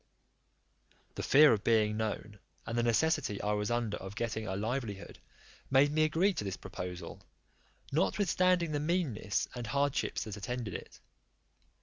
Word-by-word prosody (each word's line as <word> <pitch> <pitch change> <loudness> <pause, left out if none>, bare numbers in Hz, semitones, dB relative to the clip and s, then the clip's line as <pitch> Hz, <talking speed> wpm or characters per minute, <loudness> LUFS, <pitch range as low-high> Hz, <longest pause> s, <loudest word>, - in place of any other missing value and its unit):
The - - -5
fear 145 -1 +7
of 105 - -1
being 110 -2 +3
known, 105 -1 -4 0.3
and 115 - -4
the 120 - +2
necessity 120 -2 +1
I 105 - -1
was 105 +1 0
under 120 -3 -1
of 95 +1 -8
getting 110 -1 -3
a 95 - -2
livelihood, 110 -1 -4 0.5
made 135 +2 +5
me 155 +1 +3
agree 175 +6 +2
to 105 - -3
this 95 -2 -4
proposal, 90 -2 -7 0.7
notwithstanding 180 +1 +2
the 145 - 0
meanness 150 - -1
and 120 -2 -5
hardships 140 +3 0
that 105 -2 -7
attended 115 0 -4
it. - - -8
115 Hz, 145 wpm, -32 LUFS, 105-145 Hz, 0.7 s, fear